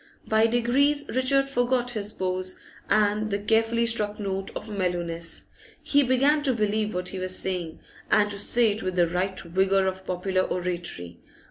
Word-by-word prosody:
By 220 +1 +3
degrees 265 +5 +2
Richard 275 +2 +2
forgot 245 -1 0
his 210 -3 -1
pose 185 -1 -3 0.3
and 215 0 +2
the 200 - 0
carefully 225 +3 +1
struck 215 -2 0
note 195 -1 -3
of - - -6
mellowness; 175 -4 -3 0.4
he 285 - +3
began 275 +3 +3
to 265 -4 +1
believe 215 -1 0
what 180 0 -1
he 190 - -5
was 185 0 -1
saying, 180 -4 -3 0.3
and 210 -1 +4
to 200 - -4
say 230 +1 +4
it 210 +2 -3
with 185 -1 -3
the 175 -1 +3
right 185 +3 -2
vigour 190 +3 +1
of 190 0 -4
popular 185 +1 0
oratory. 175 - -4
205 Hz, 165 wpm, -25 LUFS, 185-235 Hz, 0.4 s, and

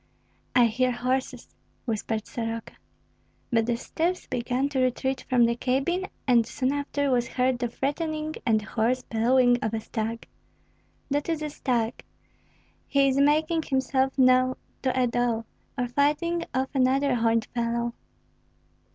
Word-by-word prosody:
"I 245 -1 +7
hear 250 +3 +1
horses," 255 +2 -2 0.3
whispered 220 -1 -2
Soroka. 230 -1 -5 0.8
But 225 -1 +2
the 240 -1 +1
steps 345 +8 -2
began 250 +3 -1
to 275 -2 -1
retreat 260 +1 0
from 245 -2 +5
the 235 0 +1
cabin, 275 +10 0 0.2
and 240 -2 +5
soon 260 +2 -1
after 285 -1 -1
was 240 -2 +2
heard 255 -1 0
the 245 - 0
threatening 310 +5 -2
and 220 -3 +2
hoarse 235 +4 0
bellowing 245 +2 +3
of 220 0 -1
a - - -1
stag. 225 +1 -4 0.8
"That 290 +3 0
is 320 -2 -1
a 300 - -3
stag! 240 -4 -1 0.9
He 275 -1 +3
is 270 +1 +1
making 310 +3 +3
himself 265 -1 0
known 255 0 +4 0.3
to 260 -1 0
a 250 - +4
doe, 235 -1 0 0.3
or 245 -1 0
fighting 300 +6 +1
off 260 +1 -1
another 270 +1 +2
horned 230 -1 +2
fellow." 235 0 -1
255 Hz, 140 wpm, -26 LUFS, 235-275 Hz, 0.9 s, I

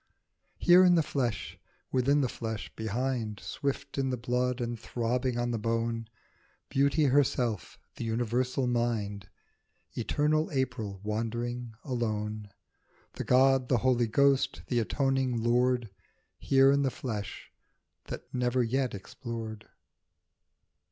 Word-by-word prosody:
Here 180 +1 +7
in 180 -1 +6
the 165 - +4
flesh, 125 -7 -2 0.3
within 135 +3 +3
the 130 - +2
flesh, 110 -3 -5
behind, 110 -1 -2
Swift 140 -1 -3
in 135 -1 +1
the 125 - -1
blood 125 +1 0
and 120 -1 -3
throbbing 120 +2 -1
on 120 0 0
the 115 - -1
bone, 115 +1 -1 0.6
Beauty 140 +3 +2
herself, 125 -6 +1 0.2
the - - -4
universal 120 +3 0
mind, 110 -5 -1 0.6
Eternal 150 +6 +1
April 125 -8 -2
wandering 115 +2 -3
alone; 110 -5 -2 0.6
The - - -5
god, 130 0 +4
the 125 - +4
holy 120 -2 +3
ghost, 140 +4 +2
the 120 - +2
atoning 130 -1 0
lord, 120 -1 +2 0.5
Here 135 0 +5
in 140 0 +3
the 135 - +2
flesh, 120 -9 -6 0.5
the - - -6
never 125 0 +1
yet 130 0 0
explored. 110 +1 -7
125 Hz, 120 wpm, -29 LUFS, 115-135 Hz, 0.6 s, Here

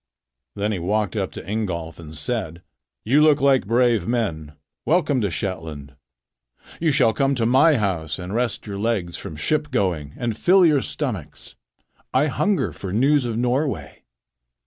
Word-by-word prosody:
Then 105 +1 -1
he 100 - -2
walked 100 +2 -1
up - - -2
to - - -9
Ingolf 90 -7 -3
and 80 -1 -8
said: 90 -1 -4 0.4
"You 135 +7 +3
look 150 -2 +5
like 135 -6 +3
brave 115 -4 +2
men. 85 -11 -2 0.3
Welcome 155 -6 +2
to 100 - 0
Shetland. 80 -6 -5 0.9
You 165 - +2
shall 130 -6 +3
come 140 -1 +1
to 115 -3 0
my 135 +5 +5
house 90 -8 -1
and 90 +1 -6
rest 120 +1 -1
your 100 -2 -5
legs 100 -6 -1
from 80 - -7
ship 150 - -1
going 90 - -1
and 120 -3 -2
fill 185 - +5
your 150 -4 +4
stomachs. 105 - -5 0.6
I 135 +3 +4
hunger 155 +2 0
for 95 - -7
news 135 +6 +3
of 115 -2 -2
Norway." 125 - -1
110 Hz, 160 wpm, -22 LUFS, 90-135 Hz, 0.9 s, look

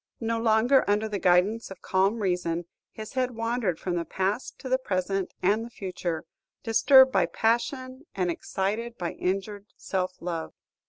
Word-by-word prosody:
No 230 0 -1
longer 230 +4 +4
under 210 +2 +2
the 205 -2 -3
guidance 185 +6 +2
of 195 - -11
calm 195 +4 +1
reason, 175 -2 -1 0.3
his 215 -1 -9
head 255 -2 -1
wandered 230 -6 -1
from 180 -2 -2
the 170 - -1
past 190 +7 -2
to - - -8
the 260 0 +2
present 195 -5 -1
and 205 +4 +3
the 235 - -8
future, 180 -6 -4 0.4
disturbed 260 +4 +6
by - - +3
passion 255 +5 -1
and 180 -2 0
excited 215 +7 -3
by 170 -1 -3
injured 195 +2 -3
self 185 -1 -3
love. 170 -2 -4
205 Hz, 160 wpm, -27 LUFS, 185-235 Hz, 0.4 s, disturbed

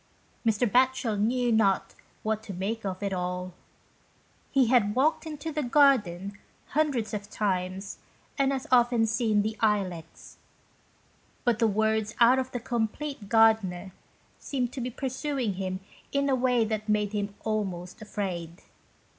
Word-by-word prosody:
Mr. 225 +1 +2
Batchel 255 -1 +2
knew 240 +3 +1
not 205 -4 +2 0.3
what 220 0 -1
to 205 -4 -8
make 215 +5 -3
of 190 0 -4
it 200 -1 -1
all. 180 0 -3 1.0
He 270 -3 +4
had 225 -3 +3
walked 305 +5 +2
into 310 +1 -5
the 300 0 -1
garden 210 - +2 0.3
hundreds 275 -8 0
of 205 0 -4
times 190 -2 -2 0.4
and 275 -2 +2
as 265 -1 -2
often 240 -2 +4
seen 220 -2 +1
the 215 +1 -2
Ilex, 190 -7 -2 1.0
but 240 -3 +2
the 230 - +4
words 220 0 0
out 245 +2 +6
of 260 0 -2
the 245 - -4
"Compleat 235 0 -3
Gard'ner" 220 -5 +3 0.5
seemed 250 -3 -2
to 260 - -4
be 245 - -2
pursuing 265 -2 -2
him 185 0 -4 0.3
in 280 0 +1
a 265 - +3
way 250 -2 +2
that 215 0 -3
made 210 -1 +1
him 205 -1 -2
almost 195 -3 -3
afraid. 180 -5 -5
220 Hz, 145 wpm, -28 LUFS, 200-250 Hz, 1.0 s, out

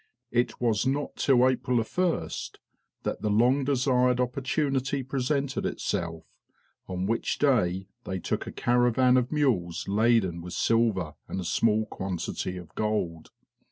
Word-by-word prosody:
It 120 +1 0
was 115 0 +1
not 140 +2 -1
till 130 -2 +4
April 125 -1 +1
1st, 170 +10 -1 0.5
that - - -3
the 105 - 0
long 125 +6 +3
desired 125 -2 +2
opportunity 135 +1 0
presented 135 +1 -1
itself, 80 -1 -3 0.6
on 90 0 -3
which 115 +3 -1
day 95 -10 +2 0.2
they 95 - -3
took 90 - -3
a - - -4
caravan 125 +1 +3
of 125 -1 +1
mules 110 - 0
laden 100 -4 +2
with 90 +1 -8
silver 110 -9 +1
and - - -4
a - - -3
small 110 +4 +2
quantity 95 -2 -4
of 90 -2 -10
gold. 100 -7 -2
120 Hz, 135 wpm, -27 LUFS, 95-130 Hz, 0.6 s, till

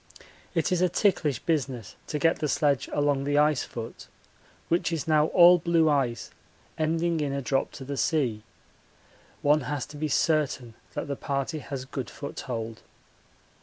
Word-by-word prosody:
It - - +1
is 180 -1 +2
a 180 - +4
ticklish 170 - +1
business 135 - -2
to 150 - -2
get 165 +3 +2
the 150 - 0
sledge 145 -1 +1
along 145 -2 +1
the 145 +1 0
ice 150 -2 +3
foot, 115 -1 -8 0.6
which 170 +1 +1
is 160 -3 -3
now 155 -1 +4
all 175 +1 +7
blue 165 -1 +3
ice 120 -7 -1 0.4
ending 165 +1 0
in 145 -2 -1
a 140 - -1
drop 135 0 0
to 135 - -8
the 140 +1 -4
sea. 130 -11 +1 1.0
One 150 +1 +4
has 140 0 -3
to 145 - -11
be 155 +1 -1
certain 145 -6 +1 0.2
that - - -3
the 140 - -2
party 140 +2 -2
has 135 -2 -6
good 130 -2 -5
foothold. 115 -5 -6
145 Hz, 165 wpm, -27 LUFS, 135-160 Hz, 1.0 s, all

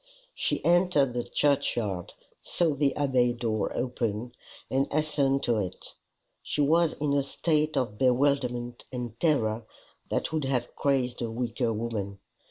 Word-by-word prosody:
She - - -1
entered 175 -7 +4
the 120 -1 -1
churchyard, 115 -10 0 0.3
saw 165 -3 +1
the 140 0 +1
Abbey 130 -4 +2
door 115 -3 -1
open, 120 -2 -2 0.4
and 135 +1 0
hastened 145 -3 +1
to 115 -3 +2
it. 95 -2 -5 0.5
She - - -4
was 160 +3 +4
in 145 -1 -1
a 140 - +3
state 155 +2 0
of 115 -6 -1
bewilderment 125 -2 +1
and 120 -3 -5
terror 115 -8 +1 0.5
that - - -1
would 155 -3 0
have 125 -3 -1
crazed 130 -3 0
a 115 - -1
weaker 115 0 -1
woman. 105 -3 -3
125 Hz, 140 wpm, -28 LUFS, 115-145 Hz, 0.5 s, entered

